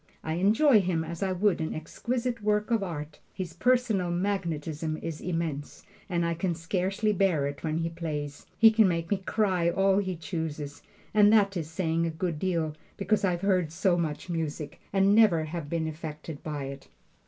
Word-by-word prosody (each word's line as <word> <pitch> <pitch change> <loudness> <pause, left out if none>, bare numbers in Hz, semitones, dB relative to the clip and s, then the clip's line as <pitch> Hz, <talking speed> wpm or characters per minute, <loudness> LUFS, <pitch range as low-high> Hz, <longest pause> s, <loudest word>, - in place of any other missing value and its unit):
I 160 - -2
enjoy 215 - +5
him 175 -3 0
as 165 +1 -7
I 195 -1 +1
would 185 -1 +1
an 160 - -2
exquisite 235 +9 -3
work 210 +2 +1
of 225 -2 +3
art. 150 -5 -5 0.2
His 180 -3 -5
personal 230 -3 +2
magnetism 165 -4 -2
is 160 -1 -6
immense, 165 -5 -3 0.2
and 170 -2 0
I 170 - 0
can 170 +1 -1
scarcely 190 +5 0
bear 180 -7 +2
it 140 0 -5
when 155 -1 -1
he 165 0 -1
plays. 150 -4 -5
He 225 -1 +8
can 220 -2 +5
make 170 -1 -1
me 200 - +3
cry 190 -3 +1
all 195 +2 +3
he 190 -2 -2
chooses, 160 -4 -5 0.3
and 210 -1 +6
that 200 -2 +4
is 160 -3 -3
saying 165 0 0
a - - 0
good 160 -1 -3
deal, 165 -4 0 0.2
because 205 +2 +1
I've 180 -3 +1
heard 185 -5 +1
so 180 +2 +2
much 160 -2 -2
music, 160 -3 -4
and 195 0 +4
never 210 -7 +5
have 155 -1 -5
been 165 -1 -1
affected 155 -1 -7
by 150 -3 -4
it. 135 0 -7
170 Hz, 185 wpm, -28 LUFS, 160-195 Hz, 0.3 s, He